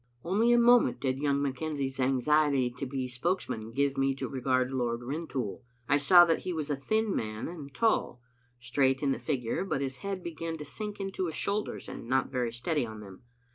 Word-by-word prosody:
Only 215 +7 +2
a 240 - +6
moment 240 0 +5
did 130 -1 -1
young 140 -1 +1
McKenzie's 140 -1 -2
anxiety 135 0 +2
to 135 +2 -5
be 130 -1 -3
spokesman 125 - -2
give 140 +2 0
me 135 0 +2
to - - -4
regard 130 -1 0
Lord 120 -2 -1
Rin 155 +7 -4
toul. 105 -8 -4 0.3
I 145 - +4
saw 175 +5 +7
that 165 -1 +2
he 180 - -4
was 155 -2 -3
a - - +1
thin 215 +9 0
man 110 0 -3
and 155 -5 -8
tall, 225 - +1 0.4
straight 130 +3 +1
in 140 - +2
the - - -1
figure, 130 -1 -1
but 195 - -1
his 135 -1 -3
head 195 +3 -4
began 165 -1 -4
to 150 - -7
sink 210 +8 -6
into 195 -2 -2
his 160 - -4
shoul 205 +1 0
ders - - -7
and - - -8
not 130 +2 +1
very 125 -3 -1
steady 130 +5 -1
on 110 -2 -7
them. 95 -2 -12
140 Hz, 210 wpm, -30 LUFS, 125-165 Hz, 0.4 s, saw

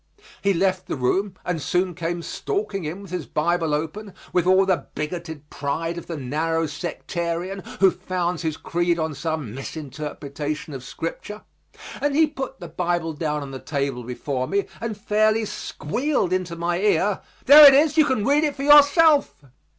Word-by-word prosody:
He 200 - +2
left 185 0 0
the - - -2
room 185 +9 0
and 170 -3 -2
soon 180 +4 0
came 170 0 -3
stalking 395 - -3
in 175 +6 -5
with 195 - -12
his 180 -5 -4
Bible 165 0 0
open, 165 +7 -4 0.2
with 180 -1 +2
all 190 +1 +5
the 190 -2 0
bigoted 160 -1 -5
pride 165 +4 -3
of 170 - -8
the 165 - -5
narrow 160 +5 -1
sectarian, 170 +3 -4 0.2
who 190 -1 +7
founds 180 -2 -3
his 160 -3 -2
creed 175 0 0
on 160 -1 -2
some 155 -6 -4
misinterpretation 145 +1 -6
of 130 -2 -7
Scripture, 170 +9 -6 0.6
and 290 -1 0
he 320 +1 +6
put 270 -3 -6
the 175 - -8
Bible 170 0 -2
down 150 -1 -2
on 140 - -8
the 135 - -6
table 140 -4 -3
before 130 +2 -3
me 200 +1 0
and 225 -2 -4
fairly 215 +1 +2
squealed 210 - -2
into 180 -2 -2
my 170 +1 -1
ear, 200 0 +1 0.2
"There 295 +2 +11
it 275 - +8
is. 300 +1 +4
You 310 -2 +5
can 260 -7 0
read 290 +3 +3
it 295 -2 0
for 275 - -5
yourself." 295 +1 +6
175 Hz, 175 wpm, -23 LUFS, 155-205 Hz, 0.6 s, There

